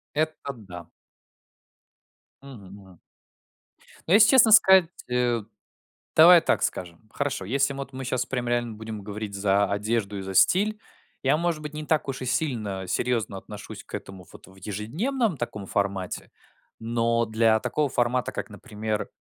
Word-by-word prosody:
Это 155 -2 -2
да. 90 -7 -11 1.5
Мгм 110 -9 -12
мгм. 95 -4 -16 1.1
Но 175 - +3
если 210 0 +7
честно 235 -4 +6
сказать, 190 -5 +7 0.2
э, 120 -2 +1 0.7
давай 170 +2 +8
так - - +1
скажем 90 +4 -4
Хорошо, 140 -9 -3
если 140 +4 +1
мы 140 - -8
вот 135 0 -7
мы 130 0 -6
щас 125 0 -1
прям 125 -2 -3
реально 120 -2 -1
будем 110 -1 -7
говорить 105 0 -6
за 100 0 +2
одежду 105 0 -1
и - - -5
за 95 0 -6
стиль 210 - +3 0.4
я, 135 +3 +3
может 170 -1 -1
быть, 150 0 -8
не 155 0 -5
так 155 -1 0
уж 135 -1 -4
и - - -3
сильно 110 -9 -2
серьезно 115 0 -1
отношусь 105 +1 -10
к - - -14
этому 95 -3 -8
вот - - -14
в 95 - -18
ежедневном 155 - -2
таком 105 -4 -5
формате, 100 -2 -3 0.5
но 115 0 0
для 110 0 +2
такого 145 +6 -1
формата, 125 -1 0
как, - - -5
например, 105 0 -5
115 Hz, 155 wpm, -25 LUFS, 100-140 Hz, 1.5 s, давай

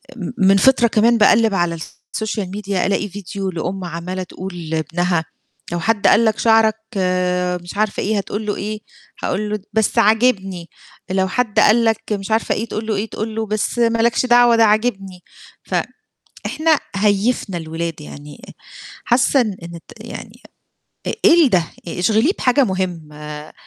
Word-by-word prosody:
م 190 -7 -5
من 195 +1 +4
فِطرة 245 +3 +4
كمان 230 +2 +3
باقلِّب 220 0 +4
على 175 -3 0
الsocial 215 +6 -5
media 200 -1 -7
ألاقي 200 +2 0
فيديو 195 0 -5
لأُم 185 +2 -4
عمّالة 175 +2 -5
تقول 175 -2 -8
لابنها: 165 +2 -1 0.5
لو 175 - -2
"حد 215 +3 +1
قال 230 - +5
لك 220 -1 +1
شعرك 225 -1 +4 0.9
مش 175 +3 -9
عارفة 215 -1 0
إيه، 215 +1 0
هتقول 205 +2 -4
له 205 - -1
إيه؟ 210 +1 -4 0.4
هاقول 210 +3 -1
له 210 - -1
د 200 - -20
بس 220 -2 +1
عاجبني، 200 -6 +2 0.4
لو 190 0 +1
حد 225 +2 0
قال 230 +2 +5
لك 225 -1 +1
مش 200 +1 -4
عارفة 220 +1 +1
إيه 225 - -3
تقول 220 0 -5
له 220 - 0
إيه؟ 210 +3 -3
تقول 215 0 -5
له 225 0 -1
بس 215 +3 -2
ما 230 -1 +2
لكش 235 +2 +2
دعوة 240 -1 +5
ده 230 - +5
عاجبني." 205 -4 0 0.4
ف - - -4 0.7
إحنا 315 -2 +2 0.2
هيِّفنا 205 -1 +1
الولاد 165 -1 -5
يعني 145 +6 -11
آآ - - -12 0.5
حاسة 255 +2 +3
إن 210 -5 -2
إن 170 0 -8
الت 170 - -13
يعني - - -10 0.7
آآ - - -1
إيه 345 -4 +7
ال - - +3
ده؟ 180 -6 +3 0.2
آآ 170 - -5
اشغليه 220 - +3
بحاجة 265 +2 +3
مُهمة. 155 -7 -5
205 Hz, 170 wpm, -19 LUFS, 180-225 Hz, 0.9 s, إيه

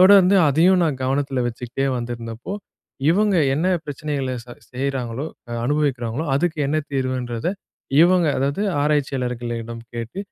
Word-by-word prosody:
தொடர்ந்து 195 0 +7
அதையும் 175 +6 +4
நான் 140 -5 -1
கவனத்தில 135 -1 0
வச்சுக்கிட்டே 125 +3 -3
வந்திருந்தப்போ, 120 - -5 0.6
இவுங்க 205 +2 +3 0.2
என்ன 170 +4 +1 0.2
பிரச்சனைகள 145 -2 -3 0.2
ச - - -20 0.2
செய்றாங்களோ 130 0 -2 0.4
அனுபவிக்கிறாங்களோ, 140 -1 0
அதுக்கு 165 0 0
என்ன 155 - +1 0.2
தீர்வுன்றத 130 -2 -1 0.5
இவுங்க 175 0 +4
அதாவது 140 +9 0 0.2
ஆராய்ச்சியாளர்களிடம் 125 -5 -1 0.2
கேட்டு, 115 - -5
135 Hz, 110 wpm, -22 LUFS, 120-155 Hz, 0.6 s, தொடர்ந்து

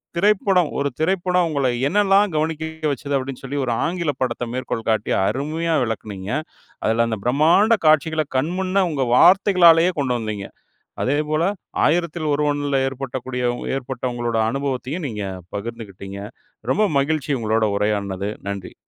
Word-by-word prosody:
திரைப்படம் 190 -2 +3
ஒரு 140 0 0
திரைப்படம் 180 +1 +1
உங்கள 140 -3 0 0.2
என்னலாம் 200 +1 +3
கவனிக்க 160 0 -2
வச்சது, 140 +1 -5
அப்படின்னு 130 -1 -5
சொல்லி 135 +2 -4
ஒரு 125 - -1
ஆங்கிலப் 165 -5 -2
படத்த 120 -1 -1
மேற்கோள் 125 -3 -4
காட்டி, 110 -1 -1 0.2
அருமையா 160 +4 -1
விளக்குனீங்க. 105 -4 -5 0.5
அதில 115 +1 +2
அந்த 110 - -3
பிரம்மாண்ட 165 - +4
காட்சிகள 155 +1 +3
கண்முன்ன, 185 +6 0
உங்க 135 -3 0
வார்த்தைகளாலயே 180 0 +6
கொண்டு 130 -3 0
வந்தீங்க. 105 -3 -4 0.6
அதேபோல 150 +3 0 0.4
ஆயிரத்தில் 170 0 0
ஒருவன்ல 145 -1 0
ஏற்பட்டக்கூடிய 130 -1 -4 0.2
உ - - -8
ஏற்பட்ட 130 -1 -6
உங்களோட 120 -1 -2
அனுபவத்தையும் 135 +4 -3
நீங்க 105 -4 -5 0.3
பகிர்ந்துகிட்டீங்க. 100 -3 -7 0.5
ரொம்ப 215 +1 +3
மகிழ்ச்சி 150 0 -1
உங்களோட 110 0 +1
உரையாடுனது. 100 -1 -1 0.2
நன்றி. 100 -2 -6
140 Hz, 125 wpm, -21 LUFS, 120-165 Hz, 0.6 s, வார்த்தைகளாலயே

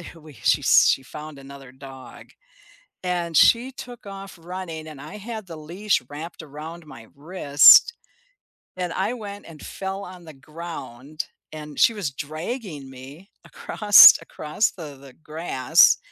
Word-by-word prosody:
we, 155 -2 -15
she 125 +5 0
she 135 - +4
found 150 +3 -11
another 135 -1 -13
dog, 130 0 -13 0.8
and 175 -3 -3
she 245 +3 +4
took 245 -4 -11
off 195 -2 -10
running 170 -2 -8
and 145 -3 -11
I 155 +8 -10
had 215 -1 -8
the 165 -2 -10
leash 175 +4 -2
wrapped 160 +3 -9
around 155 +3 -10
my 115 -6 -13
wrist, 150 - +5 0.8
and 180 -2 -4
I 200 +6 -2
went 205 -4 -9
and 155 -3 -13
fell 195 +1 -6
on 180 -2 -13
the 155 - -12
ground, 150 -1 -9 0.3
and 150 -1 -9
she 230 - +4
was 190 -10 -4
dragging 155 - -7
me 135 +9 -13 0.2
across 205 -2 +6
across 155 +8 -2
the 150 -6 -10
the 135 -2 -15
grass, 155 -4 +3
160 Hz, 140 wpm, -22 LUFS, 145-190 Hz, 0.8 s, across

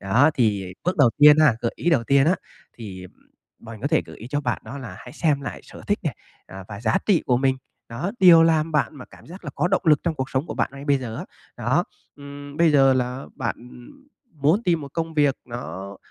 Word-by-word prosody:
Đó, 125 +11 +3
thì 100 -6 0
bước 180 +2 0
đầu 140 -6 +5
tiên 150 +1 +8
ha 150 -6 +5
gợi 115 - -1
ý 175 - 0
đầu 120 -8 +2
tiên 140 +3 +3
á, 175 - +4 0.4
thì 95 -5 -9 0.5
mình 115 -2 -11
có 140 - -2
thể 160 +2 +2
gợi - - -11
ý 115 - -10
cho 145 +2 -1
bạn 125 -4 -2
đó 140 - -8
là 115 -8 -8
hãy 125 - -12
xem 150 -4 0
lại 140 - -6
sở - - -13
thích - - +1
nè, - - -2 0.3
à, 95 0 -10
và 100 0 -8
giá 110 -1 +1
trị 195 -6 +3
của 125 - +3
mình, 130 +1 +1 0.3
đó, 125 +11 -4
điều 175 -3 +8
làm 160 -1 +2
bạn 150 0 0
mà 125 - -9
cảm - - -18
giác 180 +2 -12
là 145 - -5
có 175 - 0
động 195 - +1
lực 150 -4 +4
trong 170 -2 -1
cuộc 135 -2 -4
sống 135 +4 -1
của - - -6
bạn - - 0
ngay 140 0 -9
bây 140 -2 +2
giờ 115 -4 -6
á, - - -6 0.3
đó. - - +1 0.3
Ừm, 145 0 -10
bây 170 0 +4
giờ 135 -2 +5
là 125 +1 -2
bạn 120 -3 -3 0.8
muốn 155 +9 +2
tìm 170 -5 +1
một 140 -1 -9
công 165 -1 -3
việc 145 -3 +3
nó, 100 -5 -7
140 Hz, 240 wpm, -23 LUFS, 120-155 Hz, 0.8 s, tiên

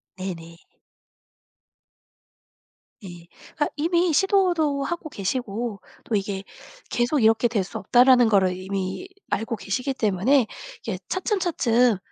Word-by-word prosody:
네네. 170 -3 -7 2.5
네. 175 -3 -11 0.3
그러니까 295 - +1
이미 340 +3 +1
시도도 345 -6 +2
하고 330 +2 -4
계시고 220 -1 -3 0.2
또 225 - -2
이게 195 -1 -2 0.5
계속 245 +5 +1
이렇게 225 +2 +4
될 220 -4 0
수 185 - -7
없다라는 245 +3 +5
거를 190 -3 +3
이미 190 - -4 0.2
알고 225 +2 -1
계시기 250 +8 -2
때문에 220 +3 +2 0.3
이게 210 -5 -4
차츰차츰 285 - +1
235 Hz, 245 characters per minute, -24 LUFS, 195-290 Hz, 2.5 s, 없다라는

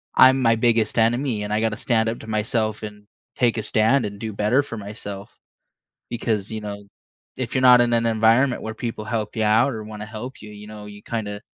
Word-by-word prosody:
"I'm 130 +1 +6
my 115 -2 +4
biggest 115 -1 +1
enemy, 115 -1 +1
and 105 - -3
I 110 - +1
gotta 110 -2 0
stand 115 -2 +1
up 115 - -4
to - - -11
myself 110 0 -1
and 105 -1 -9 0.3
take 120 -2 +2
a 110 - -2
stand 110 +5 +2
and 100 -1 -6
do 110 -1 -5
better 105 +7 +2
for 115 -4 -7
myself." 100 -1 -8 0.7
Because, 110 -4 -2
you 110 - -4
know, 100 -1 -6 0.5
if - - -4
you're 130 - +2
not 125 -1 +8
in 120 - +1
an 115 0 +2
environment 115 +4 +3
where 110 - -4
people 115 -3 -5
help 110 -1 -3
you 110 - 0
out 115 +6 +3
or 110 -1 -6
wanna 105 0 -8
help 115 +4 -8
you, 105 - -10
you 105 0 -11
know, 105 -1 -9
you 105 0 -11
kinda 105 -3 -5
110 Hz, 220 wpm, -22 LUFS, 105-115 Hz, 0.7 s, not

